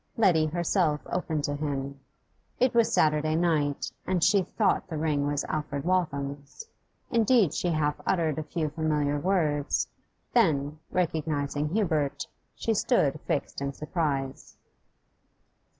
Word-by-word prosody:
Letty 170 -8 +4
herself 170 -1 +1
opened 160 -4 -2
to 145 - -1
him. 140 -2 -3 0.6
It 255 0 +3
was 235 -1 +3
Saturday 155 0 +2
night, 155 -4 +1 0.2
and 185 -3 +1
she 200 - +5
thought 205 +3 0
the 160 -4 -4
ring 150 -2 0
was 145 -1 0
Alfred 150 -2 -3
Waltham's. 145 - -2 0.5
Indeed 230 - +4
she - - -1
half 155 -3 0
uttered 160 -5 +1
a - - -3
few 155 0 -2
familiar 150 -2 0
words; 155 -5 +1 0.5
then, 155 - +2
recognising 150 -4 -1
Hubert, 155 -7 0 0.3
she 225 - 0
stood 155 - +2
fixed 140 - -2
in 140 0 -2
surprise. 150 -4 -3
155 Hz, 125 wpm, -28 LUFS, 145-175 Hz, 0.6 s, she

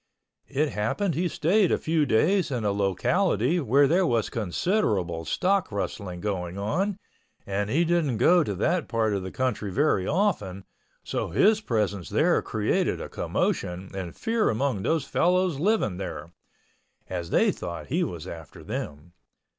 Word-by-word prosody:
It 145 +2 0
happened 150 - -1
he 175 +5 0
stayed 180 +5 +2
a - - +3
few 160 -2 +1
days 170 - +2
in 120 -5 -2
a 100 - +2
locality 115 - +1
where 140 0 +4
there 180 +5 +3
was 115 -5 0
considerable 100 - 0
stock 190 - +1
rustling 100 -3 -4
going 90 -3 -3
on 180 - -1 0.5
and 100 +1 -2
he 165 +8 +2
didn't 160 -8 +1
go 175 +9 +5
to 100 - -3
that 170 - 0
part 110 -2 0
of 100 - -1
the 95 - -5
country 115 -4 -2
very 120 -7 +1
often, 140 - 0 0.4
so - - -2
his 210 - +3
presence 100 - -1
there - - +3
created - - 0
quite - - -6
a - - -10
commotion 90 +2 -2
and 90 -3 -5
fear 225 -1 +1
among 115 -2 0
those 160 +5 0
fellows 180 -4 +1
living 185 - +1
there, 90 -2 -6 0.8
as 85 -2 -4
they - - +3
thought 85 - -6
he 170 +7 +1
was 85 - -5
after 80 -4 -10
them. 75 +4 -6
115 Hz, 160 wpm, -26 LUFS, -, 0.8 s, go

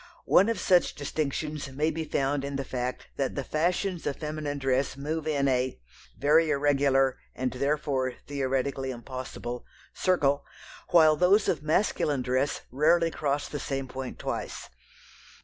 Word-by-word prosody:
One 200 +4 +5
of 230 - -1
such 180 -2 +3
distinctions 150 0 -3
may 150 +4 0
be 160 0 -3
found 140 -1 0
in 140 0 -4
the 135 - -2
fact 125 0 -3
that 135 -2 -1
the 140 - -2
fashions 175 +5 -1
of 140 - -1
feminine 150 -2 -4
dress 135 0 0
move 155 +3 -3
in 140 -3 +1
a 130 - 0 0.4
(very 155 +3 +4
irregular 140 -2 +2 0.2
and 130 0 -1
therefore 140 -1 0
theoretically 135 -1 -1
impossible) 125 -1 -6 0.3
circle, 145 -6 +2 0.5
while 155 -3 +6
those 190 +5 +4
of 165 - +1
masculine 150 -4 +1
dress 130 +3 0
rarely 165 +5 +3
cross 145 -1 -1
the 145 - -5
same 135 -1 -3
point 130 0 -6
twice. - - -4
140 Hz, 145 wpm, -28 LUFS, 135-155 Hz, 0.5 s, while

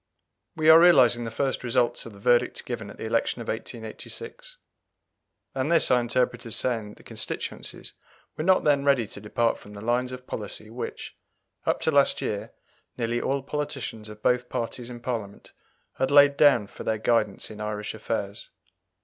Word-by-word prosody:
We 155 0 0
are 160 - +9
realizing 125 -9 +6
the - - -3
first 135 +4 -2
results 120 -1 0
of 115 - -11
the 100 - -14
verdict 120 +4 +2
given 115 -4 -5
at - - -11
the - - -6
election 115 +2 0
of 115 - -6
1886. 455 - -6 1.0
And 135 +4 -1
this 165 - +5
I 125 - +5
interpret 120 +1 0
as 115 - -1
saying 115 -5 0
that 105 - -12
the - - -17
constituencies - - -5 0.4
were 155 - -3
not 185 +2 +4
then 145 -2 +3
ready 140 -5 +3
to 100 - -10
depart 115 +2 0
from 105 - -13
the 100 - -9
lines 120 +3 0
of 125 0 -8
policy 110 0 -6
which, 125 - -6 0.5
up - - +1
to - - +2
last - - +3
year, - - -3 0.5
nearly 120 0 -1
all 135 0 -1
politicians 135 -7 -4
of 105 0 -12
both 125 0 +2
parties 120 +1 -4
in 120 -1 -9
Parliament 110 -6 -5 0.4
had 130 - +1
laid 145 0 +7
down 140 -7 +5
for - - -10
their 110 - 0
guidance 110 -2 0
in 105 0 -9
Irish 105 0 -4
affairs. 105 -2 -4
120 Hz, 180 wpm, -26 LUFS, 110-135 Hz, 1.0 s, are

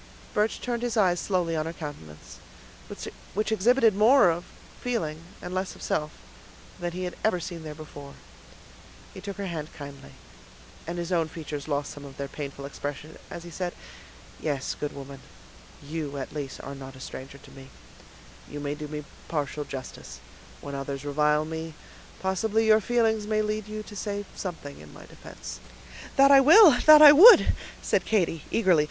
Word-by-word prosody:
Birch 210 +1 0
turned 240 -1 -3
his 240 -1 -2
eyes 180 -4 +3
slowly 175 -4 -1
on 155 0 -1
her 165 - -5
countenance, 80 - -10 1.0
which 215 +2 -1
exhibited 225 +2 +4
more 215 -1 +6
of 170 +2 -4 0.3
feeling, 165 -11 -3 0.2
and 180 - -6
less 185 0 -3
of - - -12
self, 150 0 -2 0.7
than 175 0 -3
he 185 +1 -4
had 180 - -4
ever 215 -4 +2
seen 170 -1 -6
there 155 -1 -8
before; 145 -2 -11 1.0
he 190 - -9
took 200 0 -7
her 200 - -4
hand 165 -4 -5
kindly, 140 -1 -10 0.7
and 170 +1 -4
his 170 +1 -4
own 165 -3 +2
features 155 -3 -7
lost 145 -1 -2
some 145 - -10
of 140 -1 -11
their 140 - -4
painful 140 -1 -7
expression, 145 +2 -6
as 170 - -8
he 170 - -10
said,— 175 +1 -4 0.6
"Yes, 140 -4 -2
good 150 - -3
woman, 140 0 -9 0.7
you, 150 -2 -4
at 135 - -6
least, 145 -3 -5
are 140 - -7
not 135 -1 -10
a - - -13
stranger 135 +1 -9
to - - -16
me; 135 0 -13 0.8
you 145 - -7
may 145 0 -3
do 150 0 -7
me 150 0 -6 0.2
partial 150 -1 -3
justice; 130 -2 -8 0.4
when 140 - -7
others 140 0 -5
revile 150 +1 +2
me 160 0 -6 0.4
possibly 215 +4 0
your 220 0 +5
feelings 220 -2 +1
may 215 0 +1
lead 215 0 -3
you 215 0 -6
to 210 - -12
say 205 0 -4
something 160 -6 -7
in 75 -1 -13
my - - -12
defense." - - -10 0.6
"That 275 +1 +6
I 275 - +9
will; 335 +6 +9 0.2
that 305 0 +10
I 295 - +12
would!" 390 +12 +9 0.3
said - - +1
Katy, 175 -7 0
eagerly. 185 -7 +3
165 Hz, 175 wpm, -26 LUFS, 145-210 Hz, 1.0 s, I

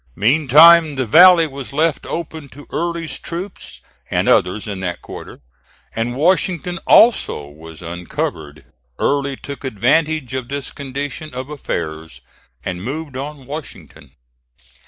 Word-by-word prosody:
Meantime 155 +6 +6
the 130 -1 -1
valley 170 - +7
was 140 -2 -8
left 155 +1 0
open 160 -3 -6
to 145 +3 -13
Early's 170 -2 -3
troops, 180 +4 -7 0.3
and - - 0
others 100 +4 +2
in 100 -2 -5
that 90 -2 -4
quarter; - - -10 0.5
and 115 +2 -2
Washington 175 +2 +1
also 225 - +4
was 80 +3 -12
uncovered. 80 -4 -5 0.3
Early 140 -1 0
took 140 +1 -9
advantage 135 +4 0
of 130 -2 -3
this 140 -1 -4
condition 140 +2 -6
of 130 +3 -6
affairs 80 - -5 0.4
and 90 -1 -4
moved 145 +3 -5
on 140 0 -7
Washington. 150 +3 -9
140 Hz, 125 wpm, -19 LUFS, 110-160 Hz, 0.5 s, valley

